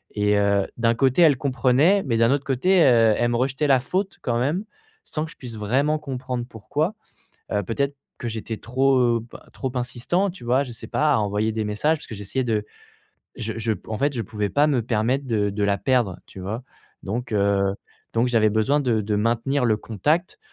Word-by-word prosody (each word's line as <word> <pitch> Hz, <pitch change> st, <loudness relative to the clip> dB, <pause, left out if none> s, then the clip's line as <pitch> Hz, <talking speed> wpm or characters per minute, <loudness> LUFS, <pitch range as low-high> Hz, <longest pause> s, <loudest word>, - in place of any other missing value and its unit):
et 105 Hz, 0 st, +2 dB
heu, 100 Hz, -1 st, +2 dB
d'un 115 Hz, 0 st, +2 dB
côté, 130 Hz, +6 st, +3 dB
elle 145 Hz, -5 st, +5 dB
comprenait, 140 Hz, +8 st, +3 dB
mais 115 Hz, -3 st, 0 dB
d'un 115 Hz, +2 st, +4 dB
autre 140 Hz, 0 st, +1 dB
côté, 175 Hz, +8 st, +3 dB
heu, 115 Hz, -5 st, +5 dB
elle 120 Hz, 0 st, +1 dB
me 120 Hz, -, 0 dB
rejetait 135 Hz, +3 st, 0 dB
la 135 Hz, -2 st, +5 dB
faute 190 Hz, +10 st, -2 dB
quand 120 Hz, -2 st, 0 dB
même. 150 Hz, +10 st, 0 dB, 0.4 s
Sans 155 Hz, 0 st, -3 dB
que 160 Hz, -, -10 dB
je -, -, -13 dB
puisse 120 Hz, -4 st, -8 dB
vraiment 135 Hz, +9 st, +1 dB
comprendre 130 Hz, -3 st, -4 dB
pourquoi. 150 Hz, -, -2 dB, 0.6 s
Heu, 105 Hz, -1 st, +1 dB
peut-être 140 Hz, +8 st, -2 dB, 0.2 s
que 120 Hz, -, -4 dB
j'étais 110 Hz, 0 st, -4 dB
trop, 130 Hz, +3 st, +2 dB
heu, 120 Hz, -2 st, +3 dB
p -, -, -9 dB, 0.2 s
trop 130 Hz, -2 st, -4 dB
insistant 125 Hz, +10 st, 0 dB
tu 175 Hz, -8 st, -12 dB
vois? 125 Hz, +3 st, +2 dB
Je 125 Hz, -, -8 dB
sais 110 Hz, 0 st, -10 dB
pas 150 Hz, +2 st, +2 dB
à -, -, +3 dB
envoyer 105 Hz, +1 st, 0 dB
des 110 Hz, 0 st, -2 dB
messages 105 Hz, +10 st, +1 dB
parce -, -, -11 dB
que -, -, -7 dB
j'essayais 105 Hz, +6 st, -3 dB
de 110 Hz, -3 st, 0 dB, 0.7 s
je 110 Hz, -, -3 dB
je 110 Hz, 0 st, 0 dB
p 100 Hz, -, -6 dB
en 110 Hz, -, -2 dB
fait, 140 Hz, +1 st, +1 dB
je 115 Hz, -, -2 dB
pouvais 105 Hz, 0 st, -3 dB
pas 145 Hz, +10 st, +3 dB
me 130 Hz, -5 st, +1 dB
permettre 120 Hz, +4 st, 0 dB
de 105 Hz, -4 st, +1 dB
de 100 Hz, +1 st, -3 dB
la 100 Hz, 0 st, +1 dB
perdre, 120 Hz, -9 st, +1 dB
tu 95 Hz, -, -11 dB
vois? 110 Hz, +7 st, -4 dB, 0.4 s
Donc, 115 Hz, +4 st, -3 dB
heu, 100 Hz, -1 st, +2 dB, 0.4 s
donc 115 Hz, +2 st, +3 dB
j'avais 110 Hz, -3 st, +3 dB
besoin 110 Hz, +8 st, +2 dB
de 120 Hz, -5 st, +1 dB
de 105 Hz, +1 st, -1 dB
maintenir 120 Hz, +5 st, +1 dB
le 110 Hz, -3 st, +3 dB
contact 150 Hz, -, -1 dB
120 Hz, 215 wpm, -23 LUFS, 110-140 Hz, 0.7 s, elle